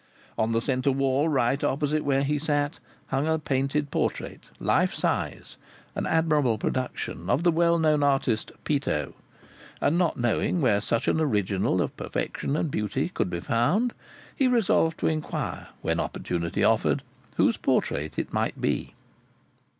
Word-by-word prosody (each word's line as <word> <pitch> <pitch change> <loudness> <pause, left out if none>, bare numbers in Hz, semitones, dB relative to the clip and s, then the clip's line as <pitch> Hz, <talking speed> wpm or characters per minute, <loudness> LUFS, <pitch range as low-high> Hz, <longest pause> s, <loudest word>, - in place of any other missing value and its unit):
On 110 +1 0
the 115 0 +1
centre 130 +2 +1
wall 135 +3 +1
right 135 -1 +1
opposite 150 +2 0
where 140 -1 +2
he 145 +1 0
sat 145 -1 0 0.3
hung 135 +3 0
a 160 0 +2
painted 140 0 -1
portrait, - - -3
life - - +2
size, - - -2 0.4
an - - -2
admirable 150 -8 +2
production 115 -6 -3
of 150 - +2
the 175 - +5
well 170 +1 +3
known 155 -2 +3
artist, 135 -5 +1
"Peto," 145 -2 -1 0.7
and 160 +5 +2
not 175 -3 +1
knowing 120 +8 +1
where 105 -9 +3
such 115 +3 -1
an 160 - +2
original 100 - +1
of - - -5
perfection 140 - -3
and 155 - -1
beauty 120 +9 -1
could 135 - -1
be 85 -1 -3
found, 185 - +1 0.4
he 270 - +3
resolved 200 -9 +2
to - - +2
inquire, 155 -1 -3 0.2
when - - 0
opportunity 85 -1 -2
offered, - - +2 0.3
whose - - +3
portrait 75 +2 0
it - - -3
might - - -1
be. - - -1
140 Hz, 150 wpm, -26 LUFS, 120-155 Hz, 0.7 s, the